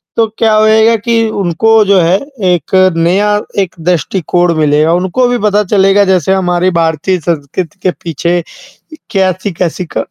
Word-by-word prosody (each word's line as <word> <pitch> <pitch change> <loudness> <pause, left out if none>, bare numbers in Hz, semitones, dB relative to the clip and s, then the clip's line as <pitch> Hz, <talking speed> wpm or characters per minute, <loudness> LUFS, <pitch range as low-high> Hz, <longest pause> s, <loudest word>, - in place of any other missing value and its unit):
तो 230 - +2
क्या 220 -1 +2
होएगा 220 +1 +3
कि 230 +2 -3 0.2
उनको 215 +3 +1
जो 200 -1 +3
है 170 +3 +2 0.3
एक 175 -5 0 0.2
नया 180 +5 +1 0.3
एक 190 -3 -2
दृष्टिकोण 175 +1 0
मिलेगा, 155 +1 +2
उनको 185 +8 0
भी 245 0 0
पता 210 0 +2
चलेगा 195 0 +2
जैसे 190 -1 +1
हमारी 180 -1 0
भारतीय 165 +2 -1
संस्कृति 165 +4 -4
के 185 - +2
पीछे 170 +2 -1 0.7
कैसी-कैसी 185 -3 -2
क - - -4
185 Hz, 140 wpm, -11 LUFS, 170-205 Hz, 0.7 s, होएगा